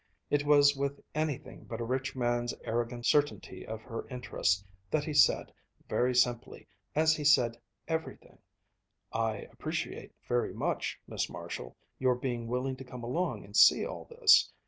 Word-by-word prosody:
It 145 0 +1
was 145 -1 +6
with 140 +1 -2
anything 155 -3 -3
but 115 - -6
a - - -2
rich 130 +3 -2
man's 120 -1 0
arrogant 120 +1 -2
certainty 145 0 +1
of 110 0 -6
her 115 - -6
interest 100 -7 -1 0.2
that 150 - +1
he 155 - -4
said, - - +4 0.3
very 125 +1 +1
simply 120 -1 0 0.3
as 155 +1 +4
he 150 - -4
said 120 -5 +4 0.3
everything: 160 0 -5 0.7
"I 110 -2 -1
appreciate - - -4
very 120 0 0
much, - - -2
Miss - - -2
Marshall, - - -7 0.2
your 130 -1 +3
being 120 -2 -3
willing 130 +2 -2
to 135 - -8
come 125 -1 -9
along 160 +10 -2
and - - -12
see - - +7
all - - -6
this. 470 -3 +5
125 Hz, 155 wpm, -31 LUFS, 120-145 Hz, 0.7 s, see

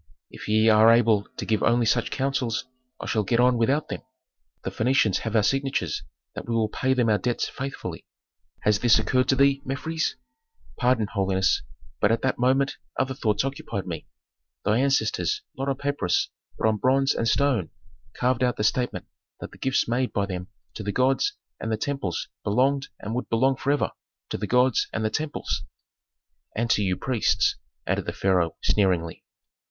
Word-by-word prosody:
If - - -9
ye 110 +1 +3
are 110 +1 +7
able 115 -3 +3
to - - -4
give 110 -2 +1
only 120 0 +3
such 115 +1 +2
counsels 130 -4 -1 0.3
I - - -6
shall 110 - +1
get 115 +4 0
on 125 0 +5
without 130 +6 +1
them. - - -4 0.6
The - - -3
Phœnicians 110 -4 +2
have 110 -1 -4
our 110 - +4
signatures 135 +4 0 0.3
that - - -7
we 115 - 0
will 110 -2 +1
pay 130 +4 0
them 125 -2 +2
our 105 -2 +3
debts 120 -1 -1
faithfully. 135 +1 -6 0.5
Has 105 -1 +2
this 120 0 +5
occurred 130 +4 +1
to 135 - +4
thee, 140 0 +3
Mefres?" 160 +5 -2 0.6
"Pardon, 125 -3 +2
holiness, 95 -2 +2 0.4
but 105 - +3
at 115 - 0
that 130 -2 0
moment 135 +2 +2 0.2
other 130 0 0
thoughts 110 -2 0
occupied 135 -8 -4
me. 85 -4 -6 0.6
Thy 105 +3 +3
ancestors, 140 - +1
not 135 +1 -2
on 135 - -1
papyrus, 140 -12 0 0.3
but - - +1
on 110 -1 +2
bronze 135 +4 +3
and 115 - -1
stone 125 - +2 0.5
carved 125 0 +1
out 125 -1 +1
the 105 - -1
statement 120 +3 0 0.3
that - - -8
the - - -15
gifts 130 0 +1
made 125 +2 0
by 100 - +1
them 90 -2 -5 0.3
to - - -6
the 100 0 -2
gods 135 - +1 0.2
and 110 - -3
the 110 - 0
temples 110 - -3 0.2
belonged 135 +6 +1
and 105 - -4
would 125 - -3
belong 130 +4 +3
forever 140 +3 0 0.4
to - - -1
the 105 - -3
gods 125 +1 +3
and 110 - -2
the 110 - 0
temples." 155 +3 -2 0.9
"And 115 +1 0
to - - +3
you 95 -3 0
priests," 125 -5 +1 0.3
added - - -1
the - - -2
pharaoh, 90 -4 +1
sneeringly. 90 -5 +1
120 Hz, 180 wpm, -25 LUFS, 105-135 Hz, 0.9 s, are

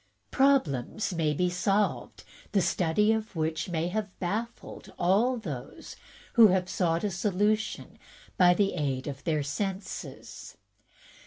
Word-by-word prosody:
Problems 215 - +1
may 160 -3 +1
be 180 +5 +1
solved 195 +3 -1
in - - -23 0.3
the 200 - +3
study 200 +6 +2
which 165 -8 -2
have 180 +4 -3
baffled 220 +6 -5
all 210 +9 +2
those 145 - -7 0.4
who 230 -3 +8
have 185 -1 +1
sought 170 -3 0
a 205 - 0
solution 210 +3 -1 0.4
by 180 -1 +5
the 200 +1 +1
aid 135 -5 -2
of 140 -1 -6
their 155 -3 0
senses. 190 +6 -6
185 Hz, 120 wpm, -28 LUFS, 160-210 Hz, 0.4 s, who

